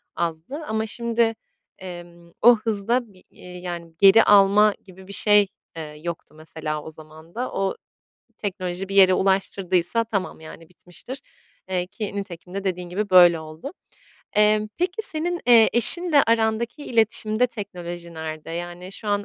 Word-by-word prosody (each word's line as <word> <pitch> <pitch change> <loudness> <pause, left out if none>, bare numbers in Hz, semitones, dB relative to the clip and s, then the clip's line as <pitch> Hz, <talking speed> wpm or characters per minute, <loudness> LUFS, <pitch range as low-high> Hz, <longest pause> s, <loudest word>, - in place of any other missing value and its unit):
azdı. 170 - -4
Ama 220 0 -1
şimdi, 230 0 0 0.4
emm, 175 -2 -11
o 240 +1 +8
hızda 225 +1 -1
bir, 185 - -21
eee, 180 0 -12
yani, 175 -2 -7
geri 200 +3 +8
alma 205 +1 +5
gibi 190 0 -15
bir 200 - -7
şey, 205 +1 +4 0.3
eee, 160 - -4 0.2
yoktu 170 -2 -7
mesela 155 -1 -5
o - - -8
zaman 160 +1 -15
da. 250 +2 -3
O 195 -1 -2 0.6
teknoloji 185 -2 -4
bir 195 - -5
yere 190 -1 +7
ulaştırdıysa 190 +1 0
tamam, 200 -7 -4
yani, 160 +1 -12
bitmiştir. 180 +9 -11 0.5
Eee, 180 -1 -2
ki 205 +2 -6
nitekim 180 -2 -7
de 200 0 -4
dediğin 180 -2 -3
gibi, 200 +4 -3
böyle 175 -3 +7
oldu. 160 - -9 0.7
Emm, 210 0 +3
peki 360 +4 -1
senin, 345 -1 0
eee, 230 -2 +6
eşinle 295 +6 +4
arandaki 230 +4 0
iletişimde 225 0 +1
teknoloji 175 -6 -8
nerede? 155 0 -7
Yani, 175 +2 -7
şu 210 +2 -8
an 205 0 0
195 Hz, 150 wpm, -23 LUFS, 175-220 Hz, 0.7 s, o